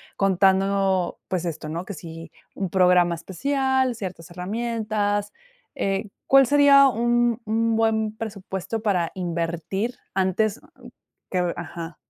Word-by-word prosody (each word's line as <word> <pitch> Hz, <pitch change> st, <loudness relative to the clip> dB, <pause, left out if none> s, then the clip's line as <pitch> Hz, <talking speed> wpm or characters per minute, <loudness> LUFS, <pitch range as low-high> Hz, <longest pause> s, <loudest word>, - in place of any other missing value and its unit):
contando, 195 Hz, -1 st, +2 dB
pues 180 Hz, -2 st, -2 dB
esto, 165 Hz, -3 st, -4 dB
¿no? 165 Hz, +3 st, -4 dB
Que 205 Hz, -, -7 dB
si 165 Hz, -1 st, -10 dB, 0.2 s
un 190 Hz, -2 st, -3 dB
programa 180 Hz, -1 st, +4 dB
especial, 265 Hz, +8 st, 0 dB
ciertas 180 Hz, -6 st, -7 dB
herramientas. 205 Hz, +1 st, -2 dB, 0.4 s
Eh, 195 Hz, +2 st, -1 dB, 0.2 s
¿cuál 270 Hz, 0 st, +7 dB
sería 280 Hz, 0 st, +7 dB
un 240 Hz, -1 st, +1 dB
un 225 Hz, +1 st, +1 dB
buen 220 Hz, -1 st, +1 dB
presupuesto 205 Hz, 0 st, -5 dB
para 185 Hz, -6 st, 0 dB
invertir, 175 Hz, +5 st, -3 dB, 0.2 s
antes 195 Hz, +3 st, 0 dB, 0.7 s
que? 185 Hz, -, -1 dB, 0.2 s
Ajá. 165 Hz, -1 st, -7 dB
195 Hz, 115 wpm, -24 LUFS, 180-225 Hz, 0.7 s, cuál